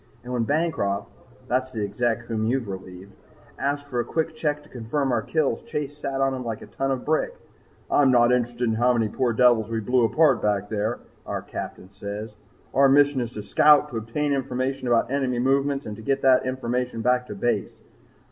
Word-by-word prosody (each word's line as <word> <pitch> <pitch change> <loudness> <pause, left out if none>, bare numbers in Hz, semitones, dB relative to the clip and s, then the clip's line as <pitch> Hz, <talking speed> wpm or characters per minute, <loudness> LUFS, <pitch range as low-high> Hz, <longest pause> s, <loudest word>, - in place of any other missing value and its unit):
"And 125 +1 -6
when 120 -2 0
Bancroft, 145 -10 -1 0.4
that's 130 +2 0
the 110 -4 -3
Exec 115 +3 -1
whom 110 -2 -2
you've 125 -1 0
relieved, 95 0 -8 0.5
asked 145 +1 -1
for 130 -4 -3
a - - +2
quick 160 +6 -2
check 150 -2 -1
to 150 - -19
confirm 130 +3 -2
our 120 -2 +1
kills, 155 +4 0
Chase 150 -11 -4
sat 135 -2 -4
on 135 0 +2
him 130 -1 -4
like 115 -2 -5
a - - -9
ton 135 - -3
of 130 -2 -2
brick. 160 - 0 0.6
'I'm 140 -2 +5
not 120 -1 +5
interested 120 0 0
in 115 -2 +2
how 120 +3 +3
many 115 -3 +1
poor 125 0 0
devils 115 -2 +4
we 115 0 -1
blew 125 +3 +2
apart 135 +2 +3
back 105 -1 0
there,' 110 +2 -1 0.3
our - - -3
Captain 95 - -7
says. 100 +2 -6 0.4
'Our 135 0 +5
mission 145 -1 +4
is 120 0 -4
to 105 - -6
scout, 150 +7 +5
to 120 - -5
obtain 140 +7 -1
information 130 -1 -2
about 120 +1 +2
enemy 135 -3 0
movements 135 +2 +1
and 105 +1 -7
get 135 +1 0
that 130 -1 +4
information 125 -2 -2
back 125 +1 +2
to 105 - -6
Base. 120 +5 0
125 Hz, 200 wpm, -24 LUFS, 115-140 Hz, 0.6 s, I'm